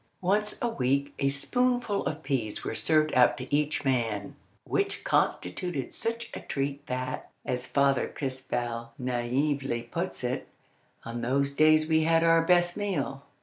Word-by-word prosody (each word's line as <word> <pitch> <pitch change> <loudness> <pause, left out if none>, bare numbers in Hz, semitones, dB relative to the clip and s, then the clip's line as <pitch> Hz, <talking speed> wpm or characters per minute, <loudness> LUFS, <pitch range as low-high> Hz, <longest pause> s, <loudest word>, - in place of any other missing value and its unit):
Once 210 +3 +1
a - - +3
week 140 - 0
a 140 - +2
spoonful 245 - +1
of 155 +1 -4
peas 115 -7 -2
was - - -2
served 155 -1 +3
out 125 -1 +5
to 130 +2 -2
each 150 0 0
man; 115 -6 0 0.3
which - - -1
constituted 135 - 0
such 230 +1 -3
a - - -4
treat 140 0 -3
that, 130 0 -3 0.2
as 125 -1 -2
Father 140 -1 +2
Crespel 120 -3 -4
naively 125 +1 -1
puts - - -4
it, - - -2 0.6
"On 115 +1 -4
those 140 +4 +1
days 155 +2 +5
we 160 0 +3
had 165 +1 +3
our 165 0 +5
best 175 0 +3
meal." 185 -9 -2
140 Hz, 145 wpm, -28 LUFS, 125-165 Hz, 0.6 s, out